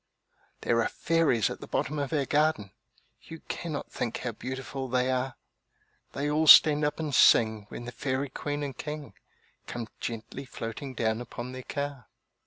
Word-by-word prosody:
There 115 0 +2
are - - +1
fairies 160 - +2
at - - -7
the - - -8
bottom 150 0 -1
of 140 -2 -2
our 145 -4 +1
garden! 150 -9 +1 0.5
You 165 -1 -10
cannot 155 -4 -5
think 115 - -3
how 125 - -3
beautiful 130 +3 -5
they 125 +1 +1
are; 130 0 -1 0.8
They 140 +1 -2
all 155 +2 +1
stand 150 0 +9
up 150 +2 0
and 155 -3 -3
sing 110 -4 +5
when 120 - -7
the 120 - -6
Fairy 130 +2 -2
Queen 145 +2 -3
and 140 -3 -4
King 150 +2 -6 0.5
Come 115 -2 -5
gently 115 +4 -5
floating 130 +3 -6
down 110 0 0
upon 120 +1 -7
their 130 0 -7
car. 140 -1 -5
130 Hz, 170 wpm, -28 LUFS, 120-150 Hz, 0.8 s, stand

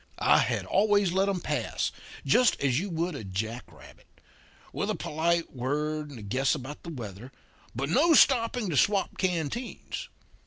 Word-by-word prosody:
I - - +6
had - - 0
always 205 -3 +3
let 190 +2 +2
'em 190 -3 -1
pass, - - -2 0.3
just 245 -2 +4
as 135 -1 +1
you 200 +3 -4
would 170 +1 -2
a 140 - -6
jack 110 +5 -4
rabbit; 80 - -16 0.7
with - - -2
a - - 0
polite 170 +2 -1
word 150 +4 -2
and 140 - -10
a 110 - -9
guess 130 +7 +1
about 145 +1 -8
the 170 - -8
weather, 120 - -8 0.4
but 135 +3 -2
no 305 - +4
stopping 235 -5 +4
to 145 - 0
swap 200 +6 +2
canteens. 185 - -3
160 Hz, 165 wpm, -28 LUFS, 130-200 Hz, 0.7 s, I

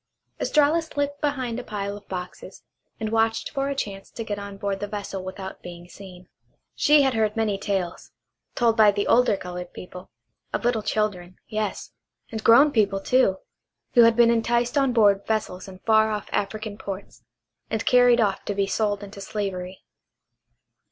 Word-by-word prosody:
Estralla 300 +2 +3
slipped 285 -2 -3
behind 260 -5 -1
a - - -6
pile 200 -2 -4
of 205 0 -13
boxes, 180 -1 -8 0.4
and 220 -1 -3
watched 225 0 +1
for 275 -1 -1
a 280 - -2
chance 195 -7 -5
to 230 - -6
get 205 -2 -4
on 200 -1 -8
board 195 0 -2
the 205 - -4
vessel 200 -2 -5
without 190 0 -7
being 175 0 -10
seen. 185 -1 -13 0.5
She 295 -1 +5
had 265 -1 +2
heard 220 -2 0
many 210 -3 0
tales, 195 -4 -3 0.4
told 230 -2 +2
by 215 -2 +6
the 205 0 0
older 245 -4 +4
colored 180 -1 -7
people, 180 0 -10 0.4
of - - -2
little 240 -2 +2
children, 200 -4 -2
yes, 215 -2 -3 0.4
and 220 -1 -5
grown 275 +6 +7
people, 200 -5 +2
too, 195 -3 +2 0.6
who 240 - +7
had 230 0 +6
been 235 0 +5
enticed 235 +2 +1
on 275 -2 +3
board 205 -4 +4
vessels 210 -4 -2
in 190 -1 -10
far 220 -1 +4
off 210 -1 -3
African 210 +1 -3
ports, 195 0 -7 0.5
and 220 -1 -2
carried 245 -1 +5
off 205 -4 +1
to 205 - -3
be 200 0 +1
sold 205 0 -1
into 200 0 -10
slavery. 190 -2 -5
210 Hz, 170 wpm, -24 LUFS, 195-235 Hz, 0.6 s, grown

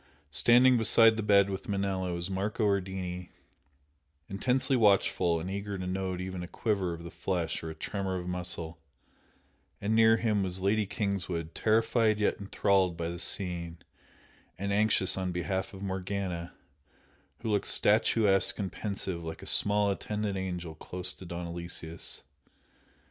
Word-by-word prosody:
Standing 120 +10 +5
beside 115 0 +5
the 110 - -2
bed 100 -1 +4
with 95 - -6
Manella 95 -2 -1
was 85 0 -3
Marco 100 +3 -1
Ardini, 95 -3 -2 1.0
intensely 130 +7 +1
watchful 100 -6 +3
and 80 - -5
eager 100 +1 -4
to 90 - -5
note 95 0 -2
even 95 -1 -5
a 90 - -6
quiver 95 -4 -1
of 85 - -11
the 85 - -8
flesh 90 -4 -2
or - - -5
the 80 - -6
tremor 95 +3 -3
of 90 - -5
a - - -7
muscle, 90 -2 -3 1.0
and 105 +2 -1
near 115 0 +6
him 110 -3 +1
was 95 -1 -1
Lady 100 +2 +1
Kingswood, 90 -6 -3
terrified 110 0 +2
yet 105 -1 0
enthralled 95 -3 +1
by 85 0 -2
the 85 0 -6
scene, 85 -3 -1 0.8
and 100 +1 -2
anxious 105 -2 +3
on 95 -1 -2
behalf 95 +2 -2
of 95 0 -9
Morgana, 95 -2 -4 0.9
who 110 - -2
looked 100 -1 0
statuesque 105 -2 +3
and 100 -3 -3
pensive 95 -4 -4
like 80 0 -7
a - - -8
small 105 0 +3
attendant 105 0 -3
angel 90 -3 -4
close 90 +3 -2
to 95 - -12
Don 85 0 -5
Aloysius. 85 -1 -6
95 Hz, 155 wpm, -30 LUFS, 90-105 Hz, 1.0 s, near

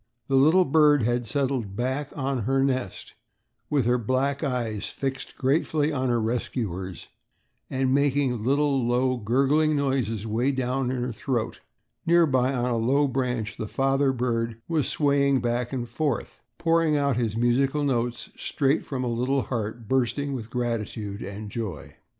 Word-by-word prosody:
The 135 - +2
little 160 +7 +5
bird 150 -2 +4
had 120 +1 0
settled 130 -5 -1
back 130 +5 -2
on 135 -1 -1
her 135 +2 +2
nest 130 -7 -2 0.6
with 140 -5 +1
her 125 +1 +2
black 135 +5 0
eyes 120 -7 -2
fixed 135 -1 -5
gratefully 150 +2 +1
on 130 -2 0
her 120 -1 +2
rescuers 110 -6 -3 0.6
and 130 0 +1
making 140 -4 +1
little, 140 +1 +2
low, 125 +2 +1
gurgling 140 +7 +2
noises 130 -7 -1
way 115 +4 0
down 130 0 -1
in 125 -1 -2
her 125 - -2
throat. 120 0 -2 0.5
Nearby 140 -7 +4
on 125 -2 0
a 120 - +1
low 135 +6 +2
branch 125 -4 -2
the 110 - -4
father 135 +3 +1
bird 115 -2 -1
was 160 -5 0
swaying 140 -2 +2
back 120 0 -1
and 125 -3 -3
forth, 135 +2 -3 0.2
pouring 165 -2 +2
out 140 -3 +1
his 115 -2 -1
musical 135 +5 +2
notes 120 -3 -1
straight 140 +1 0
from 130 -2 -4
a - - -1
little 125 +3 0
heart 115 -1 -4
bursting 135 +3 0
with 115 -4 -5
gratitude 110 -4 -3
and 100 +1 -7
joy. 105 -10 -5
130 Hz, 155 wpm, -26 LUFS, 120-140 Hz, 0.6 s, little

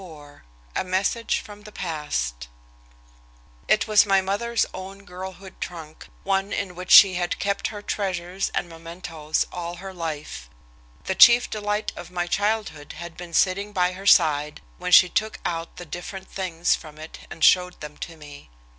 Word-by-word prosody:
XXXIV 150 -5 -13 0.4
A - - +1
MESSAGE 190 +5 0
FROM 205 0 -12
THE 210 0 -12
PAST 65 - -3 1.2
It - - +3
was 215 -1 +6
my 195 -1 +3
mother's 205 +5 0
own 195 +1 -9
girlhood 190 +1 -9
trunk, 160 -3 -8 0.2
one 195 +1 0
in 195 -3 -3
which 180 +1 -8
she 195 -2 +9
had 175 0 -1
kept 200 0 -1
her 205 -2 -8
treasures 185 -2 -2
and - - -1
mementoes 165 -2 -4
all 175 -1 -5
her 190 +2 -8
life. 155 - -6 0.5
The - - -1
chief 235 +6 +7
delight 210 0 -2
of 175 - -9
my 175 -1 -2
childhood 205 -5 -2
had 170 0 -9
been 175 -2 -8
sitting 200 +4 +1
by 180 -1 +2
her 195 +2 -7
side 150 -4 +4 0.2
when 180 0 -3
she 180 - +9
took 215 +4 -1
out 165 -1 -3
the 175 - -8
different 185 +4 -7
things 180 -3 0
from 155 -1 -6
it 155 +1 -11
and 160 - -7
showed 180 0 +4
them 150 -1 -8
to 165 -1 -8
me. 145 - -13
180 Hz, 165 wpm, -24 LUFS, 165-195 Hz, 1.2 s, she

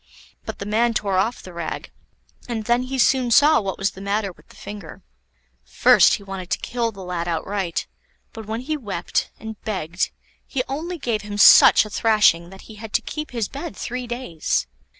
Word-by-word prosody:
But - - -5
the 200 - -6
man 225 +3 +1
tore 195 -3 +1
off 225 +6 -1
the 185 - -11
rag, 170 -2 -5 0.6
and 225 -3 -3
then 240 +2 +2
he 260 +1 -4
soon 255 -1 +3
saw 290 +4 +5
what 195 -2 -4
was 195 +1 0
the 190 - -12
matter 200 0 -1
with - - -22
the - - -17
finger. 205 -6 -10 0.6
First - - +5
he 200 - -10
wanted 190 -2 -7
to - - +1
kill 235 -1 -2
the 195 -3 -10
lad 175 -1 -3
outright, 175 +1 -2 0.5
but 220 -2 -9
when 225 +2 -3
he 310 +4 -2
wept, 200 - -2
and 220 -1 -8
begged, 185 -4 -2 0.4
he 260 -3 -1
only 330 +6 -4
gave 230 -7 -2
him 205 0 -6
such 205 - +8
a - - -8
thrashing 205 -7 +3
that 190 +1 -13
he 220 - -13
had 220 -2 -9
to - - +2
keep 305 0 -5
his 230 -5 -2
bed 305 +4 -7
three 250 0 -5
days. 240 -10 -2
215 Hz, 195 wpm, -22 LUFS, 195-245 Hz, 0.6 s, such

